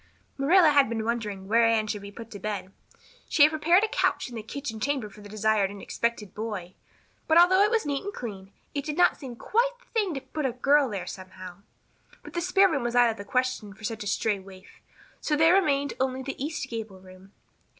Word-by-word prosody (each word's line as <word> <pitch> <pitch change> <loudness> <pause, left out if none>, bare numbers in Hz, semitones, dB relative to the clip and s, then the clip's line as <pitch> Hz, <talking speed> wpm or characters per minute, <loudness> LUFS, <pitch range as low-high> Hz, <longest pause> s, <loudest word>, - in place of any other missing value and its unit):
Marilla 325 +5 +5
had 280 -4 +4
been 225 -1 -2
wondering 210 -5 -3
where 230 +3 +4
Anne 225 -1 +3
should 210 -1 -4
be 200 - -8
put 230 +2 -11
to 205 - -8
bed. 200 -2 -4 0.6
She 295 - +5
had 300 - +6
prepared 335 +5 +3
a - - +3
couch 425 - 0
in - - -12
the 225 - -4
kitchen 225 0 -6
chamber 255 -4 -2
for 210 - -14
the 205 - -11
desired 215 -1 +1
and 200 0 -9
expected 230 -2 -3
boy. 205 -5 -5 0.5
But, 320 - +4
although 365 +3 +6
it 415 - +5
was 455 -1 +1
neat 285 -1 -2
and 405 - -4
clean, 195 - -8 0.2
it 285 -1 -2
did 300 0 -4
not 355 0 +4
seem 260 -5 -8
quite 475 - +1
the - - -26
thing 410 -8 0
to 270 - -4
put 305 0 -3
a 245 - -3
girl 275 +2 +3
there 200 -4 -4
somehow. 185 -1 -9 0.7
But - - -11
the 345 - -1
spare 375 +3 +4
room 305 -7 -1
was 240 0 -2
out 240 -1 +5
of 220 - -8
the 200 - -7
question 250 -3 -2
for 220 - -17
such 215 0 -4
a - - -6
stray 205 0 0
waif, 190 0 -15 0.4
so 300 - 0
there 320 +3 +5
remained 285 -7 +2
only 260 0 -1
the 270 0 -5
east 300 +2 -3
gable 220 -4 -6
room. 185 +1 -16
235 Hz, 230 wpm, -27 LUFS, 210-300 Hz, 0.7 s, had